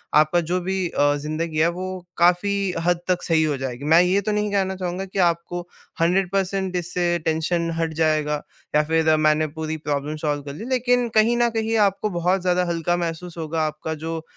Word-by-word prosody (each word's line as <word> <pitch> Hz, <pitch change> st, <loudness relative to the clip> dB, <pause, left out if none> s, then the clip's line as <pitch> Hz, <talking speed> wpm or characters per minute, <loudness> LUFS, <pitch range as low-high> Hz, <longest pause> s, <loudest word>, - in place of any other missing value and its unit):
आपका 155 Hz, +3 st, +4 dB
जो 180 Hz, -, +2 dB
भी 190 Hz, 0 st, -1 dB
अ, 145 Hz, -2 st, +2 dB
ज़िंदगी 155 Hz, +2 st, -3 dB
है, 160 Hz, -, +5 dB
वो 185 Hz, +1 st, -5 dB
काफ़ी 185 Hz, +2 st, +2 dB
हद 175 Hz, -1 st, +2 dB
तक 180 Hz, -1 st, 0 dB
सही 160 Hz, -2 st, +2 dB
हो 150 Hz, -3 st, 0 dB
जाएगी। 130 Hz, 0 st, -5 dB
मैं 170 Hz, -, +8 dB
ये 185 Hz, +3 st, +2 dB
तो 215 Hz, -, -2 dB
नहीं 210 Hz, 0 st, 0 dB
कहना 190 Hz, -1 st, +1 dB
चाहूँगा 185 Hz, 0 st, -3 dB
कि 195 Hz, +1 st, -5 dB
आपको 170 Hz, +1 st, -2 dB, 0.4 s
100% 190 Hz, +1 st, +1 dB
इससे 175 Hz, 0 st, -1 dB, 0.2 s
टेंशन 165 Hz, +1 st, 0 dB
हट 165 Hz, -1 st, -1 dB
जाएगा 150 Hz, -1 st, +1 dB, 0.3 s
या 150 Hz, -, +5 dB
फिर 160 Hz, 0 st, +2 dB
मैंने 155 Hz, 0 st, +3 dB
पूरी 160 Hz, 0 st, -3 dB
प्रॉब्लम 150 Hz, 0 st, -3 dB
सॉल्व 145 Hz, -1 st, 0 dB
कर 140 Hz, 0 st, -7 dB
ली। 215 Hz, -, -7 dB
लेकिन 245 Hz, -1 st, +2 dB
कहीं 235 Hz, +2 st, +3 dB
न 240 Hz, 0 st, +3 dB
कहीं 225 Hz, +1 st, 0 dB
आपको 195 Hz, +2 st, -4 dB
बहुत 180 Hz, +2 st, +1 dB
ज़्यादा 180 Hz, 0 st, +1 dB
हल्का 170 Hz, +1 st, 0 dB
महसूस 170 Hz, 0 st, -4 dB
होगा, 160 Hz, 0 st, -2 dB
आपका 155 Hz, +1 st, -5 dB
जो 165 Hz, 0 st, -3 dB
175 Hz, 190 wpm, -23 LUFS, 155-190 Hz, 0.4 s, मैं